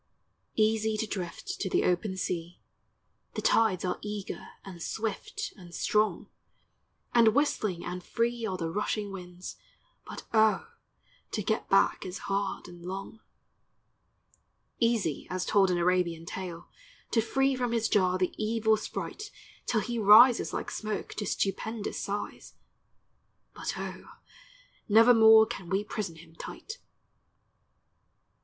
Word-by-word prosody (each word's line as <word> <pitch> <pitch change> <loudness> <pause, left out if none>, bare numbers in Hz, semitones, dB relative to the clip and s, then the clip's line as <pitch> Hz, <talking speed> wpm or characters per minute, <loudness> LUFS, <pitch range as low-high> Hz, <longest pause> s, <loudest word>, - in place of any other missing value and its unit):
Easy 220 0 +2
to 220 - -1
drift 180 -5 -5
to 190 - -1
the - - +2
open 190 +2 0
sea, 175 -2 -3 0.8
The - - -2
tides 210 -6 +3
are 180 - -2
eager 210 -1 -5 0.2
and 180 -3 -9
swift 230 - -4
and 175 -3 -12
strong, 215 0 +1 0.9
And 230 -2 +5
whistling 215 - 0
and 180 0 -5
free 235 +3 -1
are 190 -2 -3
the 165 -2 -3
rushing 210 +1 -2
winds, 180 -1 -8 0.5
But - - -7
O, 220 - +3 0.6
to 210 - -3
get 220 +3 -1
back 195 - +3
is 185 +1 -5
hard 200 -1 -2
and 175 -1 -12
long. 195 +4 -6 1.6
Easy 230 - +1
as 185 0 -2
told 195 -2 +4
in 180 - +1
Arabian 175 -2 +1
tale, 175 -1 -6 0.4
To 225 - +3
free 270 +4 +1
from 245 -2 -1
his 230 -1 +1
jar 185 -3 +2
the 185 -1 0
evil 220 0 +2
sprite 415 - -6 0.4
Till 220 -3 +2
he 235 +2 -3
rises 225 +4 +7
like - - -4
smoke 215 -2 -4
to 205 - -4
stupendous 205 +3 -2
size, 205 0 -5 1.0
But - - -4
O, - - -6 0.8
nevermore 220 0 +8
can 185 -5 -7
we 195 +3 +1
prison 205 -5 -4
him 160 0 -15
tight. 375 - -8
205 Hz, 130 wpm, -29 LUFS, 180-225 Hz, 1.6 s, nevermore